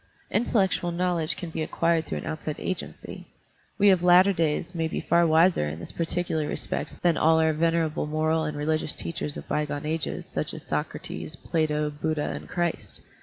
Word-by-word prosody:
Intellectual 195 -5 +1
knowl 175 0 0
edge 155 -1 -1
can 170 -2 -6
be 160 - -3
acquired 165 +1 +1
through - - -3
an - - -6
outside 155 -1 -4
agency; 185 - -5 0.5
we 205 -1 +6
of 185 -2 +3
latter 180 +2 +6
days 165 +1 0
may 165 -2 0
be - - -3
far 170 0 +3
wiser 160 - +4
in 80 +2 -6
this - - -8
par 165 - -2
ticular 160 -4 -1
respect - - -4
than 170 -3 +3
all 160 +1 +4
our 160 0 +3
venerable 165 -1 +1
moral 155 +1 +1
and 150 -1 -3
religious 155 +1 0
teachers 150 -3 -4
of - - -8
bygone 150 -1 -2
ages, 160 0 -2
such - - -4
as - - -8
Socrates, 80 0 -4
Plato, 150 -2 0
Buddha, 150 0 -2
and - - -8
Christ. 175 -2 -2
160 Hz, 185 wpm, -26 LUFS, 150-175 Hz, 0.5 s, we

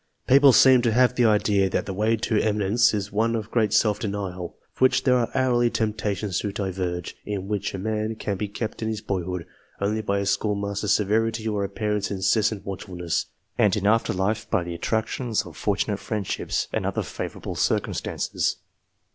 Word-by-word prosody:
People 140 +1 +7
seem 130 +2 +7
to 120 -2 +2
have 125 +1 +4
the 125 -1 +2
idea 105 -3 +3
that - - -1
the 95 - -4
way 110 +4 +2
to 110 -1 0
eminence 105 +1 +2
is 100 -1 -3
one 115 +3 +1
of 110 -1 -4
great 110 -3 +2
self 105 -2 +3
denial, 100 -5 -4 0.2
from 130 - +3
which 130 - +3
there 130 -2 +4
are 120 -2 +1
hourly 125 -2 +3
temptations 105 -4 -1
to 105 - -3
diverge: 90 -3 -3
in 100 -2 -4
which 100 -1 -2
a - - -3
man 110 +2 -2
can 100 -2 -3
be 105 +2 -3
kept 110 +3 -5
in 110 - -1
his 110 -1 -2
boyhood, 90 -4 -3 0.3
only 105 +2 0
by 100 -2 -1
a 100 - -1
schoolmaster's 100 0 -1
severity 110 +2 +1
or 105 -2 0
a 100 - -2
parent's 105 -2 -2
incessant 100 +2 +1
watchfulness, 90 -3 -3 0.3
and 105 0 +4
in 100 - -2
after 110 +2 +3
life 105 +4 -1
by 110 -6 +1
the 85 0 -5
attrac 110 +6 0
tions 115 -2 -2
of - - -11
fortunate 105 0 -1
friendships 105 -4 -2
and - - -1
other - - -1
favourable - - -6
cir - - +2
cumstances. - - -2
105 Hz, 190 wpm, -24 LUFS, 100-110 Hz, 0.3 s, People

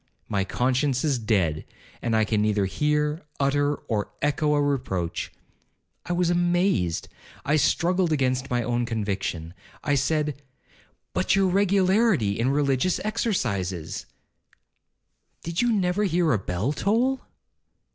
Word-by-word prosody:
My 100 -1 0
conscience 130 +5 0
is 140 -5 +1
dead, 95 -9 0 0.4
and 115 -2 0
can 105 -1 +1
neither 105 -2 +1
hear, 150 - 0 0.2
utter, 145 +1 +2
or 105 -6 -3
echo 150 +1 +1
a - - +2
reproach. 130 -12 -1 0.8
I - - -3
was 175 0 +1
amazed—I 175 - 0
struggled 175 +4 +2
against 130 -3 0
my 120 -1 0
own 120 0 -1
conviction. 100 -7 -3 0.3
I 145 - +1
said, 145 +1 0 0.7
'But - - +2
your 195 -1 +3
regularity 190 - +2
in 120 +3 +2
religious 140 +4 +1
exercises—' 115 - -2 1.4
'Did 170 0 -1
you 240 -1 +2
never 195 -1 +1
hear 175 -3 +2
a 110 - +2
bell 95 +9 -2
toll?' 240 - +1
145 Hz, 120 wpm, -25 LUFS, 110-175 Hz, 1.4 s, your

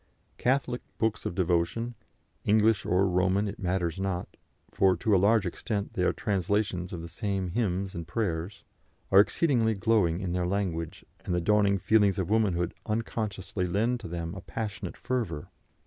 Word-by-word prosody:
Catholic 130 -1 +1 0.2
books 110 -1 0
of - - -5
devotion 90 +6 0 0.5
English 110 0 +3
or 95 +2 +3
Roman, 95 +3 +2
it 100 - -6
matters 90 -2 -1
not, 95 -2 -3 0.4
for 95 -1 +3
to 110 -4 +2
a 90 - +4
large 105 +1 +4
extent 100 +3 -3
they - - -2
are 90 - +3
translations 100 -2 -1
of 85 -2 -5
the - - -6
same 95 0 -2
hymns 95 -2 -1
and 85 -4 -6
prayers 95 -1 -2 0.5
are 95 - +8
exceedingly 110 - +3
glowing 100 -5 +2
in 95 -3 -3
their 90 0 0
language, 90 -4 -2 0.2
and 90 - -1
the - - +2
dawning 100 +2 +3
feelings 100 0 +3
of 95 0 -2
womanhood 95 -5 +2
unconsciously 105 -4 -2
lend 115 +7 +1
to 115 - -7
them 85 0 -4
a 95 - -7
passionate 100 +1 -5
fervour. 115 -12 -3
95 Hz, 165 wpm, -28 LUFS, 90-110 Hz, 0.5 s, are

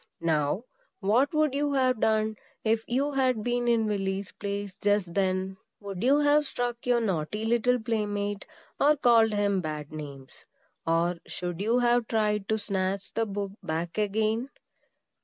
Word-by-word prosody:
Now, 160 +4 +1 0.4
what 225 +8 +2
would 305 -3 +2
you 285 0 0
have 255 -3 +2
done, 220 0 +2 0.3
if 225 0 +1
you 275 +4 0
had 255 -5 +1
been 245 0 0
in 230 -2 +3
Willy's 195 -2 -2
place 200 -1 -5
just 205 -4 +1
then? 190 0 0 0.2
Would 195 -3 -6
you 270 +4 +4
have 295 0 +4
struck 245 -1 -3
your 245 -1 +4
naughty 205 0 -2
little 240 +2 +2
playmate, 205 -3 -2 0.3
or 295 +2 +5
called 230 -4 +5
him 200 -2 +1
bad 150 -2 -5
names? 140 -3 -9 0.4
or 170 +1 +1
should 175 0 -4
you 225 +4 +2
have 240 -1 +3
tried 210 -2 0
to 220 - +2
snatch 195 -2 -2
the 225 0 0
book 200 -1 -3
back 165 +5 -3
again? 220 +4 0
210 Hz, 155 wpm, -28 LUFS, 190-240 Hz, 0.4 s, or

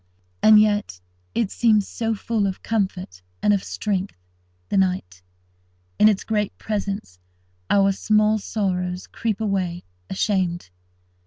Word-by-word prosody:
And 215 -1 +8
yet 205 - +1 0.4
it 225 -4 0
seems 215 -4 +3
so 225 -1 -2
full 215 -1 -1
of 190 - -5
comfort 190 - -2 0.2
and 205 - +4
of 195 - 0
strength, 200 -2 -3 0.5
the - - -1
night. 180 - 0 0.8
In 215 - +7
its 205 -3 0
great 210 -2 -1
presence, 200 - -4 0.5
our 195 -1 +4
small 215 +2 +2
sorrows 180 -3 -2
creep 225 -3 -3
away, 190 -5 -1 0.3
ashamed. 185 - -1
200 Hz, 120 wpm, -23 LUFS, 185-215 Hz, 0.8 s, And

